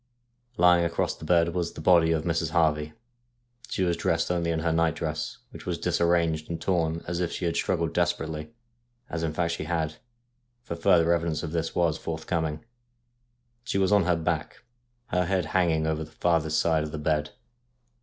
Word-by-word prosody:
Lying 90 -1 +5
across 85 -1 0
the - - -10
bed 85 0 +3
was 90 -2 -2
the - - -9
body 80 0 +5
of 80 -1 +1
Mrs. 80 -1 0
Harvey. 75 -2 +1 0.8
She 95 - -1
was 85 -2 +1
dressed 85 +1 0
only 85 -1 0
in 80 -1 0
her 85 0 +1
night 80 0 +2
dress, 75 -2 -3
which - - -11
was - - -1
disarranged 85 -2 +1
and 85 -1 -3
torn 85 -2 0
as 85 0 -2
if 85 -2 -1
she - - -3
had 85 -1 0
struggled 85 -2 0
desperately, 80 -3 -1 0.6
as 85 - -2
in 80 -1 -1
fact 85 +1 -1
she 80 - -4
had, 80 -2 -2 0.7
for 85 - -5
further 85 -1 +4
evidence 85 -2 -1
of 80 - -4
this 80 -1 -2
was 85 -3 +1
forthcoming. 80 +1 -3 1.0
She 120 - -2
was 95 +1 +2
on 100 -4 +4
her 90 0 +3
back, 80 -1 -3 0.5
her 90 0 +1
head 95 -2 +1
hanging 85 -4 +2
over 80 0 -1
the 75 - -11
farthest 80 -1 +1
side 80 -2 +2
of 75 0 -4
the 80 - -5
bed. 75 0 -1
85 Hz, 185 wpm, -27 LUFS, 80-85 Hz, 1.0 s, Lying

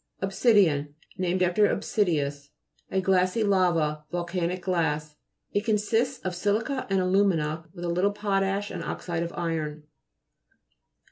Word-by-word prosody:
OBSI'DIAN 190 - +3 0.2
Named 185 0 +1
after 180 +4 +4
Obsidius. 145 -8 -1 0.4
A 190 - 0
glassy 185 +3 +2
lava. 170 -6 +2
Volcanic 175 +1 -2
glass. 155 -4 -1 0.4
It 205 - 0
consists 225 +4 +1
of 185 - -1
si'lica 215 +8 -1
and 195 0 +2
alu'mina 180 -5 +1
with 175 -1 -6
a - - -1
little 180 +4 +2
potash 200 0 -1
and 170 - -5
oxide 170 0 -3
of 170 0 -3
iron. 155 -3 -3
180 Hz, 125 wpm, -27 LUFS, 165-200 Hz, 0.4 s, after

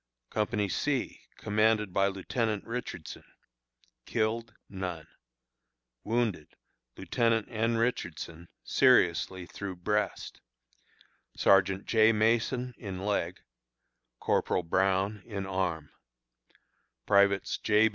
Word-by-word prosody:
Company 105 -1 0
C, 130 +8 -2 0.2
commanded 105 -2 +1
by 95 +1 +3
Lieutenant 105 +2 -2
Richardson. 115 -9 -6 0.8
Killed: 115 +1 -1
None. 90 -5 -5 1.0
Wounded: 110 -8 -1 0.4
Lieutenant 115 -2 +1
N. 115 0 0
Richardson, 85 -7 -3 0.2
seriously 95 -1 +3
through 95 +1 -6
breast; 105 +3 -2 1.0
Sergeant 95 0 +3
J. 110 0 +5
Mason, 120 +3 +1
in 95 -3 -6
leg; 90 -4 -1 0.8
Corporal 90 - +1
Brown, 95 +4 +1
in 100 -4 -5
arm; 90 -5 -2 1.1
Privates 100 -1 +3
J. 110 +1 +4
105 Hz, 85 wpm, -29 LUFS, 95-115 Hz, 1.1 s, J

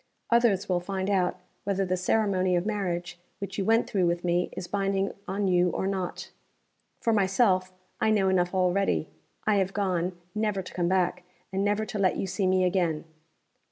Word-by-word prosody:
Others 225 -5 +3
will 180 -1 +1
find 190 +2 -2
out 185 -2 +1 0.3
whether 195 -1 0
the 185 0 0
ceremony 185 -1 +1
of 175 +1 0
marriage 180 -5 -2 0.2
which 200 0 -5
you 195 - 0
went 225 +2 +3
through 185 -4 +1
with 170 0 -1
me 175 0 +1
is 175 - -6
binding 195 0 0 0.2
on 200 +1 -1
you 180 -1 +3
or 180 - -2
not. 190 -2 -3 0.7
For 230 -3 +1
myself, 190 -2 +2 0.3
I - - +2
know 205 -3 +3
enough 180 -1 +1
already. 180 - +1 0.4
I 215 -1 +3
have 195 0 0
gone, 180 -3 0 0.2
never 210 -3 -1
to - - -10
come 175 -1 0
back, 185 -1 +1 0.3
and 195 +1 0
never 205 +1 +1
to 210 - -5
let 190 -2 +2
you - - -1
see 190 +1 -1
me 185 0 +3
again. 175 -4 +1
190 Hz, 185 wpm, -27 LUFS, 180-200 Hz, 0.7 s, Others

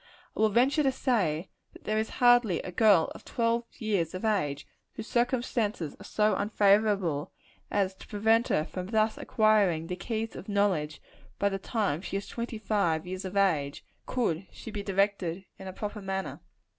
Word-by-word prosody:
I - - -8
will 220 0 +4
venture 260 +8 +3
to 270 -2 +3
say, 195 - 0 0.3
that - - -15
there 215 0 0
is 220 - -2
hardly 245 -7 +4
a 185 - -6
girl 195 -3 +4
of - - -12
twelve 235 0 0
years 200 -7 -1
of 185 - -4
age, 150 -10 0 0.3
whose 225 - -7
circumstances 235 - -1
are - - -10
so 210 0 +1
unfavorable, 200 -6 +2 0.4
as 195 -2 +1
to 190 - -15
prevent 225 +3 +2
her 155 - +1
from 185 +1 -6
thus 215 +1 +1
acquiring 205 -7 +2
the 180 - -4
keys 220 +4 -4
of 195 - -9
knowledge 190 -7 0 0.3
by 200 - +2
the 195 0 -3
time 195 - -1
she 195 - -3
is 200 - -6
twenty 235 -1 -5
five 200 -7 0
years 185 +1 -5
of 190 +2 -4
age, 155 -8 +1 0.2
could 195 -8 -1
she 225 - -9
be 210 - -4
directed 195 -2 0
in 190 - -8
a - - -4
proper 210 +2 -5
manner. 195 0 -4
200 Hz, 180 wpm, -29 LUFS, 185-220 Hz, 0.4 s, will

